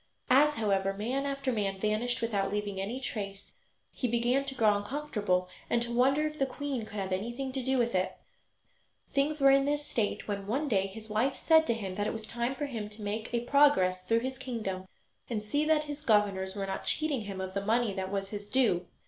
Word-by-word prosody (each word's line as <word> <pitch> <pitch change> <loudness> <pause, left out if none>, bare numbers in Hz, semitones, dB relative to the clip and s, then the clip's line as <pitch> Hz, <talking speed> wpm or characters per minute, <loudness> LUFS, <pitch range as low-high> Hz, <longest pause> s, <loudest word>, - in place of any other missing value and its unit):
As, 295 +3 +6
however, 195 -3 +1
man 255 +7 -1
after 275 -1 -1
man 200 -4 -1
vanished 215 +4 0
without 200 -4 0
leaving 205 -2 -2
any 225 +7 -3
trace, 200 -6 -5 0.4
he 250 - -2
began 240 +3 +2
to 270 -1 -3
grow 215 -4 +4
uncomfortable 205 -5 -1 0.2
and 235 - +3
to 235 0 -4
wonder 270 +5 +3
if 305 0 -4
the 270 - +2
queen 265 -3 -3
could 215 - -11
have 190 -1 -3
anything 240 +8 -2
to 265 0 -2
do 265 +1 +1
with 240 -1 +1
it. 185 0 0 1.0
Things 295 +2 +1
were 275 0 +7
in 275 0 +5
this 290 +1 0
state 220 -7 -2
when, 200 -1 -3
one 275 +8 0
day, 195 -6 +2
his 215 +3 -9
wife 225 +6 +1
said 320 -1 +4
to 235 - +2
him 195 -4 -4
that 205 0 0
it - - -1
was 220 -1 -5
time 235 +4 -2
for 290 - -2
him 225 -7 -5
to 210 0 -8
make 215 +2 -3
a 235 -1 0
progress 240 -9 +4
through 225 +5 +2
his 260 +1 -4
kingdom 195 -8 -4 0.4
and 220 -3 -2
see 290 +8 0
that 310 -1 +3
his 295 0 -6
governors 205 -6 +2
were 200 -1 -2
not 195 - -4
cheating 290 -8 0
him 195 -2 -5
of 190 0 -4
the 200 0 -2
money 225 0 +2
that 190 -1 -4
was 195 -1 -2
his 205 0 -6
due. 210 -9 +2
225 Hz, 220 wpm, -30 LUFS, 200-270 Hz, 1.0 s, were